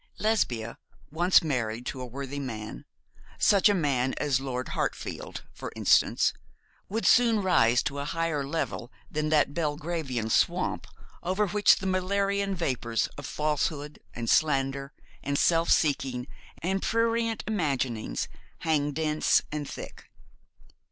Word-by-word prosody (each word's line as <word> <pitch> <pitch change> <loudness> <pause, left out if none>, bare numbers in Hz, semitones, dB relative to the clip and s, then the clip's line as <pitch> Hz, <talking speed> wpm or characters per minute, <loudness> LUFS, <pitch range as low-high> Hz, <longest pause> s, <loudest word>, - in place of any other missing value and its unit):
Lesbia, 125 - 0 0.3
once 175 +4 +4
married 120 -6 -2
to 130 - -4
a - - -4
worthy 135 +3 -5
man, 110 - -6 0.5
such 200 0 +5
a - - +4
man 135 -6 +1
as 140 -3 +1
Lord 130 -1 -4
Hartfield, - - -4
for - - -7
instance, - - +3 0.6
would 225 +3 -2
soon 230 -4 +5
rise 125 -10 +4
to 140 - -3
a 140 - -3
higher 165 -2 -1
level 135 -4 -3 0.2
than 155 0 -1
that 150 -2 +3
Belgravian 150 -7 -2
swamp - - +1 0.3
over 190 +4 +1
which 205 +2 +5
the 190 - -6
malarian 195 +1 0
vapours 125 -9 -1
of 145 -2 -7
falsehood, 150 0 -2 0.2
and 115 -1 -4
slander, 135 -1 +2 0.3
and 140 +1 -1
self 165 +1 +3
seeking, 135 -4 +1 0.4
and 190 +2 0
prurient 230 -1 0
imaginings 135 - -1 0.3
hang 150 -3 +1
dense 155 0 +2
and 150 -1 -4
thick. - - -9
150 Hz, 130 wpm, -28 LUFS, 130-185 Hz, 0.6 s, such